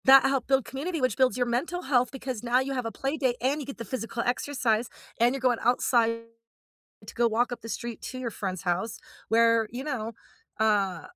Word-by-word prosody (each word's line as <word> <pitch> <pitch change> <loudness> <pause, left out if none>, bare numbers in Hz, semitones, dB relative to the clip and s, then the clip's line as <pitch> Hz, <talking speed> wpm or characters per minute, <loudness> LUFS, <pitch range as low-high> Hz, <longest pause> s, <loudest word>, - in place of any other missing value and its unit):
That 270 0 +9
help 270 -2 +1
build 270 -2 +3
community, 315 +6 -3
which 255 -5 +1
builds 260 -1 +3
your 245 - +2
mental 275 +10 -1
health 255 -4 +2
because 260 -4 -5
now 245 +1 +3
you 270 +1 -2
have 250 -3 -2
a - - -4
playdate, 270 -2 -1
and 270 +4 +1
you - - -6
get 275 - -7
the 230 - -6
physical 230 +1 -3
exercise, 245 -3 0 0.3
and 240 +2 +4
you're - - -3
going 250 -2 +2
outside 235 -1 +3 0.9
to - - -9
go 240 - +3
walk 230 +2 +1
up 240 - -6
the 225 - -8
street 235 0 -5
to 255 - -6
your 250 -2 -3
friend's 190 -4 -4
house 185 +5 -1 0.3
where, 230 -1 +4
you 250 +3 -5
know 235 -7 -3 0.5
uh, 200 -6 +2
245 Hz, 210 wpm, -27 LUFS, 230-265 Hz, 0.9 s, That